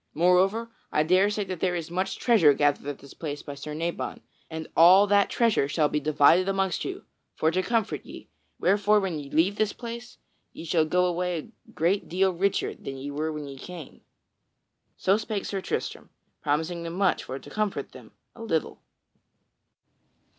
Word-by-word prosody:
Moreover, 190 +7 +3 0.2
I 150 - +2
dare 185 +5 +4
say 210 0 -1
that 185 -3 -6
there 180 0 0
is 170 -1 -5
much 190 +2 -2
treasure 185 - +5
gathered 145 -1 +1
at 145 - -4
this 140 - -14
place 145 -3 -6
by 145 - -7
Sir 150 +2 -7
Nabon, 170 +2 -3 0.3
and 160 -1 -6
all 185 +5 +8
that 200 0 +3
treasure 230 - +2
shall 150 0 +1
be 150 - 0
divided 155 +5 +4
amongst 195 -2 0
you, - - -6 0.3
for 160 - +2
to 185 +2 +1
comfort 210 - -1
ye, - - -11 0.3
wherefore 205 +3 +3
when 185 -6 -2
ye 140 -1 -9
leave 180 +8 +2
this 215 -1 +1
place, 235 +1 -8 0.4
ye - - -9
shall 160 -1 +2
go 180 +3 +2
away 180 0 -1
a 155 - -12
great 180 +5 0
deal 185 +2 +2
richer 195 +3 0
than 135 0 -8
ye 140 +2 -6
were 155 +2 -2
when 150 -1 -5
ye 135 -1 -9
came." 170 -2 -10 1.0
So 195 +2 +3
spake 215 -2 -3
Sir 195 -1 -3
Tristram, - - -4 0.3
promising 160 +4 -1
them 165 0 -5
much 190 +1 +1
for 130 - -5
to - - -12
comfort 215 -2 -2
them - - -14 0.2
a - - -12
little. 165 -9 -2
180 Hz, 180 wpm, -26 LUFS, 155-195 Hz, 1.0 s, all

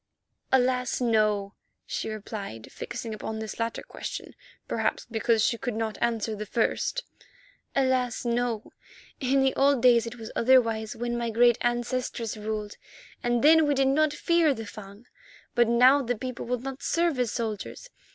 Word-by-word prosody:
"Alas! 250 -1 +2
no," 215 -4 +1 0.3
she - - -3
replied, 205 - -7
fixing 240 -2 -6
upon 220 +1 -5
this 220 +1 -6
latter 230 0 -2
question - - -7 0.3
perhaps - - -1
because 225 -1 +2
she 235 - 0
could 245 -4 -3
not 220 -1 -3
answer 225 -2 0
the 210 0 -6
first. 370 - 0 0.7
"Alas! 260 -3 +1
no. 235 -2 -1 0.5
In 270 0 +2
the 265 - +2
old 275 -2 +3
days 235 -2 +5
it 230 - -6
was 225 -2 -8
otherwise, 230 -3 +3
when 240 +1 -2
my 235 -1 -1
great 235 +1 +4
ancestresses 240 -1 -1
ruled, 210 -1 -4 0.4
and 240 0 0
then 315 0 +6
we 290 - +2
did 270 0 +3
not 305 +2 +3
fear 320 -1 +2
the 225 - -6
Fung. 205 +1 -11 0.5
But 240 -1 +4
now 250 +4 +6
the 245 -1 -1
people 255 0 -5
will 250 +1 0
not 270 +2 -6
serve 335 -5 +1
as 245 -3 +1
soldiers. 230 - -5
240 Hz, 160 wpm, -27 LUFS, 220-260 Hz, 0.7 s, then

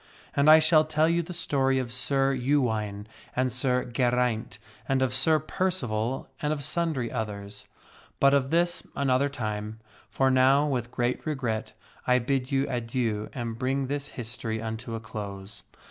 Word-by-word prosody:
And 140 +1 +4
I 155 - +10
shall 155 0 +5
tell 155 0 +2
you 170 +1 +2
the 170 - -8
story 135 -6 +1
of 125 -3 -2
Sir 135 +2 +1
Ewaine 115 -6 0 0.3
and 130 0 +1
Sir 125 0 +1
Geraint, 125 -2 0 0.3
and 135 -1 +2
of 130 -1 0
Sir 155 +4 +4
Percival 135 - -2
and 150 - 0
of 150 -2 -2
sundry 150 -5 -1
others. 100 -2 -5 0.5
But 140 0 +5
of 135 -2 +2
this 175 +2 +1
another 140 0 +2
time. 110 -4 -4 0.3
For 135 0 +2
now, 130 +3 +4
with 125 -5 -2
great 120 0 -1
regret 125 -7 -2 0.3
I 125 0 +5
bid 130 +2 -1
you 135 0 +2
adieu 115 -4 -2
and 115 -3 -5
bring 135 +1 0
this 145 +2 -3
history 115 -1 -3
unto 115 +1 -5
a - - -4
close. 105 -3 -7
130 Hz, 160 wpm, -27 LUFS, 115-140 Hz, 0.5 s, I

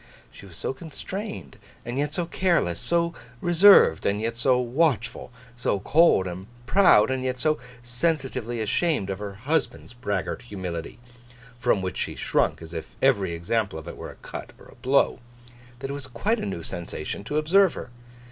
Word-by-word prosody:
She 100 - -13
was 85 -4 -12
so - - -2
constrained, 175 +3 -7 0.3
and 120 +3 -3
yet 145 0 0
so 175 +2 -2
careless; 170 - +1
so 170 0 +1 0.3
reserved, 175 - +6
and 100 +1 +1
yet 115 +1 -2
so 125 +2 +3
watchful; 125 -3 0 0.2
so 120 -4 0
cold 150 - +4
and 90 +2 -6 0.2
proud, 130 - +5
and 130 -1 -1
yet 130 -1 -1
so 155 +3 +1 0.2
sensitively 125 -3 -1
ashamed 110 - 0
of 95 - -4
her 100 -1 -6
husband's 130 +2 -2
braggart 105 -4 -3
humility—from 120 +4 -5
which 95 - -3
she - - -3
shrunk - - 0
as 80 +1 -10
if 80 - -7
every 100 -10 +2
example 95 +3 -1
of 80 - -9
it - - -7
were - - -8
a - - -11
cut - - -9
or - - -16
a - - -16
blow; 135 +1 +3 0.6
that 135 +2 -5
it - - -3
was 140 -2 -6
quite 200 - -1
a - - -3
new 85 -4 -4
sensation 85 +1 -5
to 145 +8 -2
observe 180 +5 +4
her. 125 - -7
120 Hz, 175 wpm, -25 LUFS, 100-150 Hz, 0.6 s, reserved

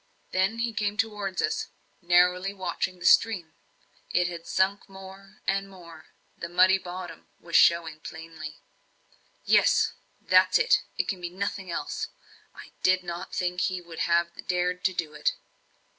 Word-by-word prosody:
Then 190 +4 +1
he 230 0 -1
came 210 -1 -1
towards 210 -5 -1
us, 445 0 -1 0.3
narrowly 180 +2 +3
watching 185 0 -3
the 175 - -9
stream. 180 -8 +4 0.6
It 180 0 +2
had 170 -1 -7
sunk 195 +2 0
more 195 +1 -13
and 195 0 0
more 170 -4 -13 0.3
the 170 - -6
muddy 185 +2 +5
bottom 180 0 -8
was 170 -1 -6
showing 165 -2 +4
plainly. 160 -1 -9 0.9
"Yes - - +4 0.3
that's - - +4
it 460 +1 +3 0.2
it - - 0
can 190 -3 -3
be 175 - -4
nothing 195 0 -4
else! 170 - -3 0.5
I - - -12
did 185 0 +3
not 175 +1 -6
think 180 0 -1
he 185 -1 0
would 170 -2 -11
have 170 0 0
dared 180 0 0
to 190 - +3
do 160 -3 -3
it." - - 0
180 Hz, 150 wpm, -27 LUFS, 170-195 Hz, 0.9 s, muddy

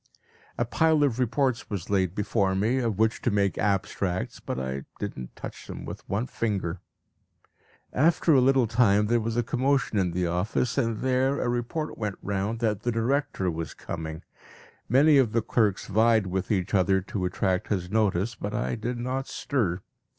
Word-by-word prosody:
A 120 - +1
pile 155 +5 +3
of 130 -4 +1
reports 130 0 0
was 100 -2 -4
laid 95 -2 +1
before 100 -2 +1
me, 110 +7 +1
of 115 -6 -1
which 110 +1 +1
to - - +1
make 100 -3 +1
abstracts, 95 -2 -1
but - - -4
I 65 +1 -4
did - - -4
not 65 -1 -8
touch - - -8
them - - -7
with - - -9
one 105 +5 0
finger. 100 -8 -2 1.1
After 160 +3 +3
a 135 - +6
little 135 -1 +4
time 105 -2 +3
there 120 +2 +2
was 115 +1 -2
a 120 - +2
commotion 130 -2 +1
in 95 -2 +1
the 90 +1 -1
office, 95 +8 0
and 115 -2 0
there 130 +2 +1
a - - -1
report 120 +6 -2
went 105 -3 -2
round 100 +3 -2
that 105 -3 0
the 120 - 0
director 115 -5 0
was 80 0 -5
coming. 80 0 -6 0.7
Many 140 +4 +6
of 120 -5 +2
the 115 - +2
clerks 110 -4 +1
vied 110 +1 +3
with 95 0 -2
each 95 -2 0
other 95 0 +3
to 95 0 -3
attract 90 0 0
his 90 -3 -2
notice; 105 0 +1
but - - -5
I 65 +1 -1
did 120 +3 -3
not 130 +2 -3
stir. 100 -10 -1
110 Hz, 180 wpm, -27 LUFS, 95-125 Hz, 1.1 s, a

